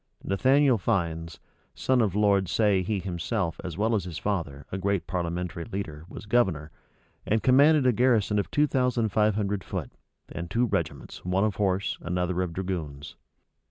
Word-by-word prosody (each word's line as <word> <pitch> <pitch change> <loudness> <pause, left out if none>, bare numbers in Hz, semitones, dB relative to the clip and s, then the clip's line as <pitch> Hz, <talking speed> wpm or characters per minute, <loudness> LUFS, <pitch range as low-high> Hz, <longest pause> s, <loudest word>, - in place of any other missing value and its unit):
Nathaniel 130 +4 +3
Fiennes, 85 -6 -2 0.4
son 130 -1 +2
of 100 -4 0
Lord 100 -3 +3
Say 100 -1 +3
he 100 +3 -1
himself, 85 -2 -3
as 90 -3 -6
well 110 +3 +1
as 100 -5 0
his 85 -3 -6
father, 80 -10 -3
a 95 - -3
great 100 -2 0
parliamentary 85 -1 -3
leader 90 -7 -6
was 105 - -9
governor, 95 -10 +1 0.5
and 110 +1 0
commanded 140 +2 +5
a 125 - +5
garrison 115 -4 +2
of 100 - -2
two 150 - +3
thousand 125 -5 +1
five 105 0 +2
hundred 100 -3 -1
foot, - - -5 0.4
and 85 0 -6
two 115 +6 +2
regiments, 115 - -3
one 90 +2 +1
of 105 -4 0
horse, 100 -1 0
another 90 +1 -1
of 90 -2 -2
dragoons. 80 -6 -5
95 Hz, 165 wpm, -27 LUFS, 85-110 Hz, 0.5 s, commanded